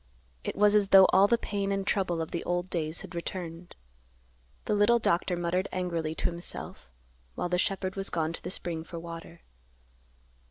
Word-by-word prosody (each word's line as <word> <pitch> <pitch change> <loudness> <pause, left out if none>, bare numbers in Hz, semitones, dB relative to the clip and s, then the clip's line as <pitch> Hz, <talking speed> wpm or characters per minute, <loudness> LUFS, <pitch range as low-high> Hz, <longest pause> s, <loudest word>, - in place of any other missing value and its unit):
It - - -3
was 210 +1 +4
as 205 -2 +4
though 190 -1 +9
all 195 +2 +7
the 235 - +3
pain 200 -3 -2
and 195 -1 -1
trouble 175 -5 0
of 160 - -9
the 170 - -3
old 175 +1 -2
days 160 -1 -2
had 190 -2 -10
returned. 170 0 -6 0.9
The - - 0
little 210 +3 +5
doctor 180 -4 +1
muttered 175 +2 0
angrily 170 -4 -2
to - - -4
himself 170 - -5 0.5
while 175 - -2
the 180 0 +1
shepherd 190 0 -1
was 195 0 -3
gone 160 -1 -1
to - - -6
the - - -5
spring 170 -3 -3
for 170 - -8
water. 165 0 -9
180 Hz, 185 wpm, -29 LUFS, 170-195 Hz, 0.9 s, though